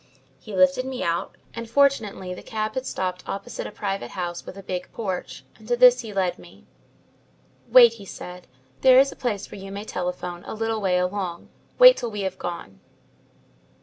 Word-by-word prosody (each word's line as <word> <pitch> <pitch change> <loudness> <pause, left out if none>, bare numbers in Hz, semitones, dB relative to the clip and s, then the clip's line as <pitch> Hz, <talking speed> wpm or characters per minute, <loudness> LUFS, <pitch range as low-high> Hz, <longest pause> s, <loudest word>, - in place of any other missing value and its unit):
He 215 -3 -8
lifted 185 +6 +4
me 260 -1 -4
out, 170 0 -2 0.2
and 230 -1 -7
fortunately 230 -8 +1
the - - -9
cab 215 -1 -3
had 260 +2 -3
stopped 185 -1 -3
opposite 220 +5 -5
a - - -9
private 195 - -4
house 175 -1 -4
with 185 - -8
a 195 - -9
big 180 -1 -5
porch, 190 -6 -5
and - - -15
to 485 - +1
this - - +7
he 220 - -6
led 185 -3 -1
me. 175 - -16 1.0
"'Wait,' 240 -2 +8
he - - -10
said. 180 0 -9 0.3
'There 255 -1 +7
is 275 +1 +5
a - - -11
place 215 -6 -3
where 195 - -9
you 195 0 -8
may 200 +2 -6
telephone 180 -2 -4
a - - -6
little 225 0 -2
way 185 -2 +2
along. 180 -1 -3 0.3
Wait - - +9
till 240 - -3
we 210 -2 -5
have 190 -1 -3
gone." 170 - -6
195 Hz, 190 wpm, -24 LUFS, 180-230 Hz, 1.0 s, Wait